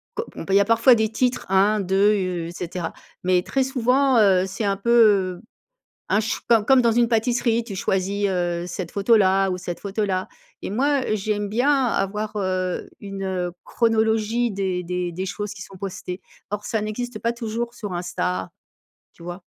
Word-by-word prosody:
co 455 - -3
on - - -6
peut 195 - -2
il - - +7
y - - +6
a 200 - +2
parfois 230 +3 +5
des 220 -1 +1
titres 250 +2 0
1-2 200 +1 +3
u 180 -3 -2
et - - -7
cetera. 175 -1 -5 0.3
Mais 180 0 +2
très 270 - 0
souvent, 260 +1 +2
heu, 190 -3 +4
c'est 195 +4 -5
un 195 -1 +1
peu, 235 +4 -1 0.5
heu, - - -16 0.7
un 205 - +3
ch 225 - -3
comme 225 -3 +4
comme 265 -2 +5
dans 235 - +3
une 240 0 +3
pâtisserie. 235 0 +1
Tu 215 -4 -7
choisis, 195 +2 0
heu, 175 -2 -1
cette 175 -1 -5
photo 205 +3 +3
là 195 -1 +3
ou 180 - -2
cette 175 -1 -6
photo 205 +1 -2
là 185 -1 -1 0.4
et - - -3
moi 280 +5 +2 0.2
j'aime 205 0 -2
bien 265 +4 +2
avoir, 210 -1 -2
heu, 185 -2 -2
une, 195 -1 -6
heu, 180 -2 -2
chronologie 225 0 +1
des 190 -2 -2
des 180 0 -3
des 185 +3 -3
choses 205 +1 -4
qui 200 - -11
sont 190 0 -13
postées. 185 -1 -6 0.3
Or, 205 0 -4
ça 220 -3 -1
n'existe 215 +2 -4
pas 230 +1 0
toujours 235 0 -4
sur 205 -6 -6
Insta, 95 - -2 0.7
tu - - -16
vois? 175 +2 -7
205 Hz, 195 wpm, -23 LUFS, 185-230 Hz, 0.7 s, il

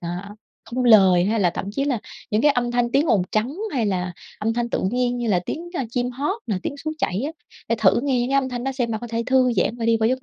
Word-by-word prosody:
à, 180 +4 -6 0.3
không 250 +2 -2
lời, 190 -6 +6
hay 215 +2 +1
là 180 - +3
thậm 175 - -5
chí 275 +6 -1
là 265 -5 0 0.3
những 215 +2 +1
cái 295 - +6
âm 245 -3 0
thanh 240 0 +1
tiếng 290 +4 +3
ồn 205 -9 +3
trắng, 235 +9 0 0.2
hay 240 -5 0
là 180 -2 -1 0.3
âm 220 +2 0
thanh 240 0 -1
tự - - -1
nhiên 245 0 0
như 235 -2 -2
là 180 -4 +3
tiếng, 345 +2 -5
a, 270 - -1
chim 245 0 -1
hót 285 - -2
nè, 210 -4 -1
tiếng 285 - -4
suối 310 - -2
chảy 190 +5 -1
á, - - -3 0.4
để 230 - +2
thử 205 +2 +4
nghe 265 -3 +1
những 245 - -1
cái 275 - +1
âm 260 - -3
thanh 245 0 -4
đó 270 - -1
xem 245 -3 -1
bạn 220 - -2
có 240 - -6
thể 230 0 -2
thư 255 -1 +3
giãn 215 +3 0
và 230 - -4
đi 230 0 +4
vào 220 0 +2
giấc 260 +1 -1
240 Hz, 295 wpm, -22 LUFS, 215-255 Hz, 0.4 s, lời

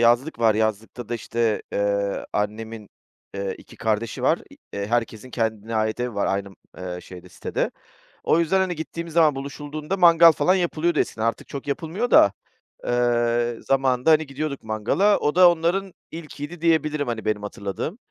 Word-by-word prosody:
yazlık 120 +5 +3
var 115 -2 +4
yazlıkta 110 +2 -2
da, 120 - -2
işte, 115 -1 -1
eee, 100 0 -1
annemin, 110 +1 -3 0.5
eee, 100 -1 -3
2 - - -15
kardeşi 110 0 -2
var. - - +3 0.3
Eee, 100 0 -3
herkesin 115 +1 -2
kendine 110 -1 -2
ait 110 +1 0
evi 125 -2 -2
var 100 - 0
aynı 100 0 -1 0.5
şeyde 90 0 -12
sitede. 90 - -3 0.5
O 165 - +3
yüzden, 170 +3 +2
hani, 185 -2 0
gittiğim 165 +1 -6
zaman 160 -3 +4
buluşulduğunda 145 +5 -5
mangal 170 -2 +8
falan 165 +5 +2
yapılıyordu 170 -3 0
eskiden 110 - -1
artık 115 - -2
çok 140 0 -7
yapılmıyor 170 - -2
da, 100 - +7 0.5
eee, 120 -1 +1
zamanında, 135 +1 +2
hani, 155 0 +4
gidiyorduk 140 0 -4
mangala. 110 - +2
O 150 - 0
da 180 -1 +8
onların 175 +3 -1 0.2
ilkiydi 160 0 -8
diyebilirim, 155 -3 +1
hani, 115 -2 -3
benim 105 -1 0
hatırladığım. 100 - -5
125 Hz, 155 wpm, -23 LUFS, 110-160 Hz, 0.5 s, mangal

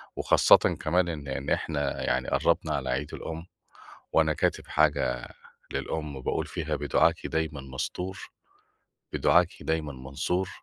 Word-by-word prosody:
وخاصةً - - +6 0.2
كمان 85 +3 +2
إن 75 -4 -5
إن 70 +1 -3
إحنا 70 -3 -1
يعني 65 0 0
قرّبنا - - +2
على 65 -2 -3
عيد 65 +3 -2
الأم، 80 +1 -6 0.7
وأنا - - +4
كاتب - - 0
حاجة 70 -5 +1 0.4
للأم 75 -4 -3
باقول - - -1
فيها 80 -2 -3
بدُعاكِ 75 0 +2
دايما 80 -2 -2
مستور، 80 +8 -5 0.8
بدُعاكِ 85 0 +4
دايما 80 -3 -1
منصور، 70 +8 -2
75 Hz, 125 wpm, -28 LUFS, 70-80 Hz, 0.8 s, وخاصةً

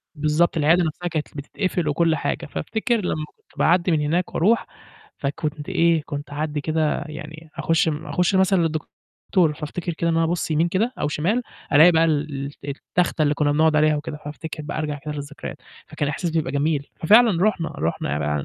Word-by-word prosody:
بالضبط، 155 +3 +1
العيادة 160 +4 +4
نَفْسها 170 +2 -3
كانت 155 -3 -2
ل - - -8
بتتقفل 170 +3 -2
وكل 165 +2 +2
حاجة، 145 - -2
فافتكر 225 - -1
لمّا 155 -4 -2
كنت - - -20
باعدّي 175 +1 +3
من 155 -2 +2
هناك 170 +5 -1
وأروح 220 +7 +2 0.5
فكنت 150 +2 -3
إيه، 170 -3 +3
كنت 145 -1 -6
اعدّي 150 0 -2
كده 155 0 0
يعني 155 +1 -9
أخُش 165 0 +2
م 150 -1 -3
أخُش 180 +1 +1
مثلًا 190 0 +4
للدكتور 160 +1 -1
فافتكر 165 +3 -4
كده 170 +1 -1
إن - - +1
أنا 165 - +3
أبُصّ 165 0 -1
يمين 160 +2 +2
كده 210 +7 0
أو - - +1
شمال 180 +12 0 0.3
ألاقي 160 +4 +8
بقى 165 0 +4
ال 145 -3 -1
ال 140 - -7
التخته 155 +4 -1
اللي 150 -1 +2
كنّا 145 0 +1
بنقعُد 155 +1 +3
عليها 155 0 +4
وكده، 150 0 -5
فافتكر 155 +1 -6
بقى 150 0 -5
أرجع 150 -2 -2
كده 150 - -3
للذكريات 145 0 -7 0.3
فكان 145 - -2
إحساس 165 +4 -2
بيبقى 160 -4 -1
جميل، 145 0 0
ففعلًا 210 0 +5
رُحنا 190 -6 +1
رُحنا 75 -2 -1
155 Hz, 185 wpm, -23 LUFS, 150-170 Hz, 0.5 s, ألاقي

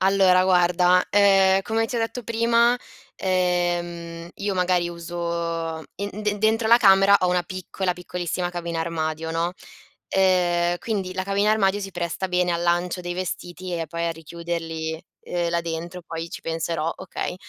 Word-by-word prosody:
Allora 190 -1 +4
guarda, 180 0 +4
ehm, 195 -1 +5
come 225 +2 0
ti 245 0 -4
ho - - +1
detto 230 +2 -2
prima, 235 +2 +3 0.4
ehm, 175 -2 -1
io 200 -1 -3
magari 180 -1 +1
uso 170 -1 -3
in 200 +1 -5
de 210 0 0
dentro 220 +1 +2
la 235 - +8
camera 195 -3 +6
ho 180 - +2
una 180 0 +2
piccola, 185 +1 -3
piccolissima 180 0 -3
cabina 170 -1 -4
armadio, 160 -1 -2
no? 170 +2 0 0.5
Ehm, 175 -2 +2
quindi 195 -5 -3
la 185 0 -2
cabina 200 +2 +2
armadio 205 -2 +2
si 195 -1 -5
presta 175 +1 -3
bene 180 -1 +1
al 170 - -1
lancio 175 +1 0
dei 175 0 -4
vestiti 180 0 -5
e 165 -2 -4
poi 170 +2 -2
a 165 - 0
richiuderli, 165 0 -5 0.2
uhm, 175 -1 -1
là 170 - +1
dentro, 170 +2 -5
poi 165 0 -5
ci - - -7
penserò, 165 0 -2
okay. 185 -1 -4
180 Hz, 160 wpm, -24 LUFS, 170-195 Hz, 0.5 s, la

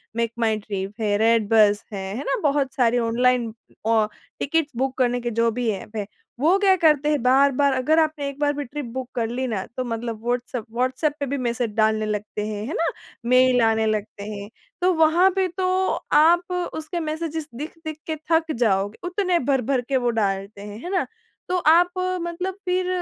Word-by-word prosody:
Make 230 -1 0
माई 220 -2 +2
trip 200 -1 -5
है, 205 -1 +1
red 225 0 +3
bus 210 -2 +4
है, 195 -1 -4
है 275 - -4
ना? - - 0
बहुत 280 -2 +1
सारी 245 -2 +2
ऑनलाइन 245 -1 +2 0.3
औ 225 -1 +3 0.3
टिकट 320 +1 +1
बुक 265 +1 -1
करने 245 -1 +1
के 240 0 -2
जो 230 0 +3
भी 240 0 -1
ऐप 210 +2 -7
है। 205 -2 -3 0.3
वो 330 +8 +4
क्या 390 -2 +5
करते 300 -2 +4
हैं 295 -3 +1
बार-बार 275 +2 +4
अगर 265 +5 +2
आपने 310 -2 0
एक 280 - -9
बार 290 -1 +2
भी 290 - -2
ट्रिप 290 +3 -6
बुक 260 -1 -4
कर 230 -2 0
ली 250 +3 -3
ना 210 -6 -3
तो 255 - 0
मतलब 230 -1 -4
व्हाट्सऐप 245 -1 -2
व्हाट्सऐप 255 +5 0
पे 285 - -1
भी 280 +2 -2
मैसेज 240 -2 -1
डालने 220 0 +2
लगते 210 0 -3
हैं, 210 -1 -4
है 300 - -4
ना? - - 0 0.5
मेल 255 0 +5
आने 225 -1 +3
लगते 215 -1 -2
हैं। 200 -1 -6 0.3
तो 365 +1 +3
वहाँ 325 +3 +4
पे 380 -1 +2
तो 375 - 0 0.5
आप 345 +4 +5 0.2
उसके 315 +3 -4
मैसेजेस 315 -1 -3
दिख-दिख 315 +3 -7
के 315 - -1 0.2
थक 325 0 +3
जाओगे। 205 -3 +1
उतने 360 -1 +1
भर-भर 265 -1 +1
के 270 - +2
वो 245 -1 +1
डालते 200 -2 -2
हैं, 205 +1 -8
है 355 - -5
ना? 370 -3 +1 0.4
तो 365 - +1
आप 350 +1 +5 0.3
मतलब 345 +2 -3
फ़िर 365 0 0
255 Hz, 195 wpm, -23 LUFS, 225-315 Hz, 0.5 s, क्या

